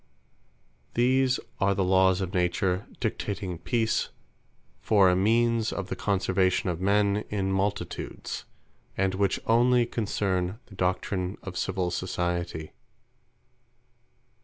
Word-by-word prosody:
These 130 +2 +3 0.2
are 100 0 +2
the 95 - +1
Lawes 95 0 +4
of 95 -1 -3
Nature, 90 +2 0
dictating 100 -6 -3
Peace, 115 +3 0 0.7
for 100 -2 +4
a - - +2
means 115 +3 +2
of 100 -1 -4
the - - -2
conservation 95 -2 +1
of 85 0 -5
men 100 +1 +3
in 95 -2 -1
multitudes; 100 +2 -3 0.5
and 95 0 +1
which 100 0 +1
onely 120 +1 +4
concern 100 -4 -1
the 100 - -15
doctrine 95 0 -1
of 95 -2 -7
Civill 90 -1 -1
Society. 85 -3 -2
95 Hz, 110 wpm, -27 LUFS, 90-105 Hz, 0.7 s, Lawes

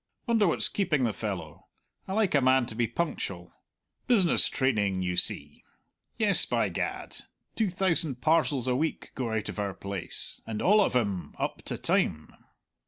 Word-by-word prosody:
Wonder 225 -5 +3
what's 165 - +2
keeping 155 -9 0
the 115 -3 +1
fellow. - - -6 0.4
I 190 - -4
like 215 -2 +1
a 140 - +4
man 130 0 +4
to 115 - -5
be 120 0 +1
punctual. 100 - -4 0.5
Business 195 -9 +4
training, 105 -8 0
you 90 -1 -2
see; 75 -4 +1 0.5
yes, - - +5
by - - +1
Gad, - - -4 0.4
two 220 -3 +1
thousand 170 -7 +1
parcels 140 -2 +2
a 125 - +1
week 160 +5 -2
go 120 -3 -3
out 110 -1 -2
of - - -5
our 100 -2 -3
place, 100 -3 -4
and 110 -2 -4
all 210 +3 +4
of 195 - +1
'em 100 -7 -1
up - - -3
to - - -3
time! 75 0 0
125 Hz, 170 wpm, -28 LUFS, 100-170 Hz, 0.5 s, yes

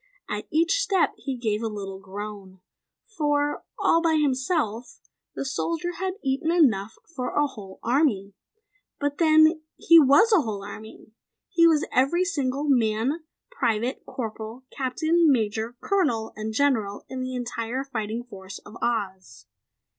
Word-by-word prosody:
At 210 0 -4
each 330 +9 +2
step 395 -7 +2
he 270 -3 -5
gave 220 -3 -1
a 230 - -1
little 195 -3 -6
groan, 195 -1 -8 0.5
for 295 -7 -1
all 330 - +3
by 330 -1 +2
himself 260 - -1 0.4
the - - -3
soldier 335 +5 -2
had 375 0 -2
eaten 275 +4 0
enough 225 - +2
for 255 -7 -5
a 295 - +3
whole 205 -9 -9
army. 230 -7 +1 0.7
But 285 0 -2
then, 315 0 +5 0.2
he 335 0 +7
was 320 - +5
a 385 - +6
whole 210 -6 -4
army; 215 +2 -10 0.4
he 335 -3 +5
was 315 -3 +3
every 310 +8 +2
single 280 -6 -1
man, 250 +4 +1 0.3
private, 240 - -1
corporal, 225 +1 -6
captain, 315 +5 +2
major, 225 -1 -1
colonel 295 - 0
and 215 +1 -4
general 220 -5 0
in 260 -1 -5
the 255 0 -4
entire 240 +1 -3
fighting 230 -3 -4
force 195 -5 -10
of 215 +3 -11
Oz. 190 - -3
255 Hz, 140 wpm, -25 LUFS, 215-310 Hz, 0.7 s, he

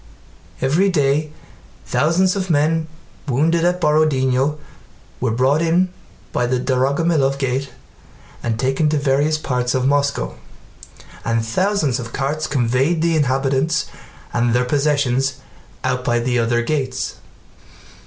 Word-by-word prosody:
Every 165 +9 +2
day 150 -2 +1 0.5
thousands 170 +8 +2
of 190 -2 -3
men 160 +1 +2 0.4
wounded 160 +6 +2
at 180 +1 +1
Borodinó 150 -3 +2 0.6
were 125 - 0
brought 130 +7 +2
in 170 +3 +2 0.4
by 120 - +1
the 125 0 0
Dorogomílov 135 +2 +1
gate 135 0 -2 0.7
and 115 -2 -2
taken 135 +4 +1
to 150 - +1
various 145 +2 +1
parts 125 -4 -1
of 130 0 0
Moscow, 140 - +1 0.9
and 115 -1 0
thousands 155 - 0
of 115 -2 -7
carts 145 +3 -2
conveyed 135 +5 +1
the 170 -1 +2
inhabitants 135 +1 +1 0.5
and 120 0 +1
their 125 +1 +2
possessions 140 -1 +1 0.5
out 125 0 -1
by 120 -1 +1
the 120 +1 0
other 120 +1 +1
gates. 130 -3 -2
140 Hz, 125 wpm, -20 LUFS, 125-155 Hz, 0.9 s, Every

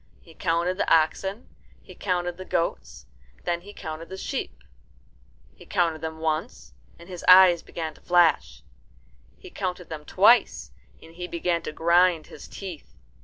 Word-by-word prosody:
He 165 - -18
counted 170 +3 -1
the - - 0
oxen, 190 +7 +1 0.4
he - - -13
counted 175 -2 -2
the 185 - -7
goats, 65 - -3 0.3
and - - -28
then 170 0 -1
he 200 +3 -12
counted 160 -3 -8
the 190 - -7
sheep. 270 +7 -5 0.9
He - - -15
counted 165 -4 0
them 160 0 -5
once, 160 0 -4 0.2
and 170 - -15
his 180 -2 -8
eyes 185 -2 +8
began 160 -2 -6
to - - -21
flash. 170 - +2 0.7
He 65 - -13
counted 180 -2 -5
them 155 -2 -7
twice, 195 - +3 0.3
and 165 - -15
he 180 +1 -6
began 170 0 -1
to - - -6
grind 170 +1 +3
his - - -12
teeth. 180 - -9
170 Hz, 160 wpm, -25 LUFS, 160-185 Hz, 0.9 s, eyes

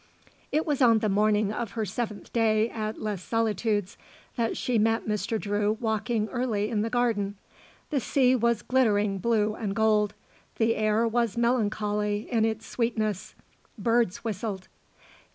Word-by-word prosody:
It 310 - +1
was 290 -3 -1
on 230 -3 +6
the 215 -1 0
morning 210 +1 +2
of 230 -3 -4
her 220 -2 -1
seventh 215 +1 -5
day 220 -1 +3
at 215 -1 -4
Les 210 -4 -3
Solitudes 215 -2 -1 0.4
that 230 -1 -1
she 245 -3 0
met 225 +1 +1
Mr. 215 +1 -1
Drew 205 +1 0
walking 220 -1 -1
early 225 -5 -1
in 215 -2 +1
the 225 - -1
garden. 225 -5 0 0.6
The 285 - +2
sea 260 +1 +3
was 235 -2 +1
glittering 210 -6 +2
blue 215 0 +1
and 205 -2 -4
gold; 210 -1 +2 0.4
the 230 0 +2
air 215 +2 +2
was 235 -2 0
melancholy 210 -3 0
in 225 -2 +3
its 220 0 -2
sweetness; 215 -5 -2 0.4
birds 230 -2 +1
whistled. 205 -3 -4
220 Hz, 150 wpm, -27 LUFS, 210-235 Hz, 0.6 s, on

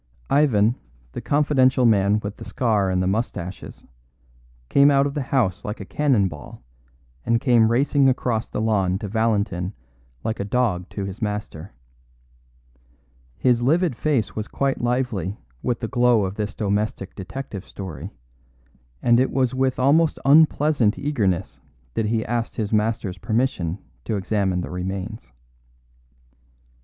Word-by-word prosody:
Ivan, 120 -6 +3 0.3
the - - -6
confidential 135 -3 +3
man 105 -1 +3
with 100 0 -6
the - - -9
scar 105 -6 0
and 90 0 +1
the - - 0
moustaches, 95 -3 -4 0.8
came 140 - +5
out 140 -1 +4
of 140 - -2
the 145 - -2
house 130 -8 0
like 105 +1 -5
a 100 - -7
cannon 130 -6 +2
ball, 75 -6 -10 0.6
and 115 0 +2
came 115 -3 +4
racing 135 +2 +3
across 120 -3 -1
the - - -3
lawn 100 -4 +1
to 105 +1 -5
Valentin 105 -4 0 0.5
like 110 - -2
a - - -1
dog 100 -5 0
to 100 - -4
his 100 +5 -7
master. 105 -4 -4 1.6
His 120 -2 +2
livid 160 +3 +2
face 135 -6 0
was 110 0 -4
quite 135 -2 -1
lively 120 -6 -1 0.2
with 120 -2 -2
the 115 - -2
glow 120 -4 +3
of 95 - -4
this 105 0 -4
domestic 100 -1 -2
detective 100 0 -7
story, 95 -5 -7 0.9
and 120 0 +5
it 130 - +2
was 130 -2 0
with 130 0 0
almost 150 +5 +3
unpleasant 145 -5 +4
eagerness 105 - -1 0.3
that 110 - -1
he 110 0 0
asked 120 0 -2
his 110 -1 -3
master's 105 -3 0
permission 110 -7 -1 0.3
to 110 - -1
examine 95 -2 0
the - - -6
remains. 95 +4 -5
110 Hz, 145 wpm, -23 LUFS, 100-130 Hz, 1.6 s, came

